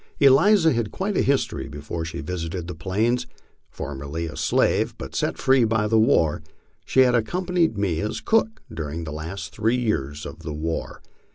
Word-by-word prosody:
Eliza 160 +5 +6
had 115 -3 -1
quite 195 +1 -2
a - - +3
history 140 -1 0
before 75 +3 -5
she 80 - -5
visited 90 -1 -4
the 90 - -5
Plains. 110 +9 0 0.4
Formerly 70 +4 -5
a 80 - -6
slave, - - +1
but - - -8
set - - -1
free 130 -2 +4
by 110 -1 +1
the 110 +1 +3
war, 85 -7 +3 0.4
she 130 - +3
had 125 -1 +5
accompanied 170 - +1
me 95 -6 0
as 105 +1 -2
cook 225 0 +1
during 80 +1 -4
the 75 -2 -6
last 80 +6 -6
three 115 +3 +1
years 75 - -2
of 80 +4 -8
the 80 -2 -6
war. 80 +2 -4
105 Hz, 175 wpm, -24 LUFS, 80-130 Hz, 0.4 s, Eliza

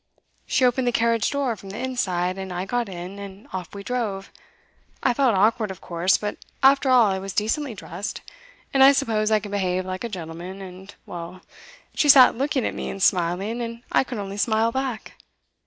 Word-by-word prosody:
She 255 - +3
opened 250 +1 +2
the - - +3
carriage 230 -2 +2
door 280 -5 -1
from 195 -2 -12
the 200 - -7
inside, 195 -8 -1
and 190 -1 -6
I 180 +1 -3
got 240 +1 -1
in, 185 +2 -7
and 200 0 -10
off 185 +1 -6
we 200 - -7
drove. 210 -5 -3 0.7
I 250 - +3
felt 255 -4 +2
awkward, 215 +2 +2
of 190 - -7
course, 175 +2 +1
but 210 0 -5 0.2
after 270 0 +5
all 250 -3 +6
I 190 - -1
was 195 0 -6
decently 225 +5 -1
dressed, 190 +2 -6 0.5
and 270 -1 +6
I 275 +1 +8
suppose 220 -6 0
I 215 -1 +3
can 205 0 -9
behave 185 -2 -1
like 185 +2 -5
a 235 - -3
gentleman, 175 0 -7
and 190 0 -10
well, 175 +1 -8 0.5
she 295 - +2
sat 265 -2 +8
looking 270 0 0
at - - -1
me - - -5
and 195 - -4
smiling, 190 +5 +1
and 230 0 -6
I - - +4
could 255 -3 -6
only 200 -1 -5
smile 220 +1 +2
back. 260 -2 -4
210 Hz, 200 wpm, -24 LUFS, 190-245 Hz, 0.7 s, I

